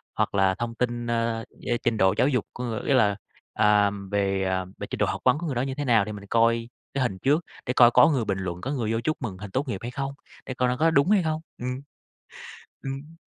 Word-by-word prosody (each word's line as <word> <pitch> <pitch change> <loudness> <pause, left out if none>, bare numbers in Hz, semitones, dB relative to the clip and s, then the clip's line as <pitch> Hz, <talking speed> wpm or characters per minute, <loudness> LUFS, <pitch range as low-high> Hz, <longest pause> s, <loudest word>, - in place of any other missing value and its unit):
Hoặc - - 0
là 95 -1 +3
thông 120 -1 -4
tin, 120 -1 -2
ơ, 115 -1 -1 0.2
yeah, 120 -1 +1
trình 120 -2 +1
độ 95 -2 +4
giáo - - +4
dục 125 -7 0
của 125 - -6
người 115 -3 -3
ý 140 - +3
là, 105 -6 +4 0.4
à, 105 -1 +4 0.2
về, 100 -1 +1
à, 95 0 -1
về - - -6
trình - - -4
độ - - +3
học - - -3
vấn 130 +3 +5
của 170 - -5
người 135 - -2
đó 120 - +1
như 135 0 -3
thế 145 +1 -3
nào, 115 -6 +4
để 105 - -5
mình 100 -1 -8
coi 115 +1 +2 0.2
cái 135 - 0
hình 95 -7 -2
trước, 150 - +2 0.2
để 125 - -1
coi 120 -2 +7
có 125 +5 +6
người 130 -7 0
bình 100 -2 -1
luận, 90 -2 -4
có 135 - -3
người 120 -6 -1
vô 115 - 0
chúc 155 +6 -1
mừng 105 -7 -4
hình 100 0 -8
tốt 135 +6 -1
nghiệp 100 -5 -3
hay 120 - -5
không, 135 +2 -4 0.3
để 130 - -4
coi 125 0 +1
nó 125 - -1
có 165 +3 +3
đúng 140 +3 +3
hay 200 -4 +4
không. 155 -1 -1 0.2
Ừm. 125 +2 -4 1.0
Ừm. 140 +4 -6
120 Hz, 265 wpm, -26 LUFS, 105-135 Hz, 1.0 s, coi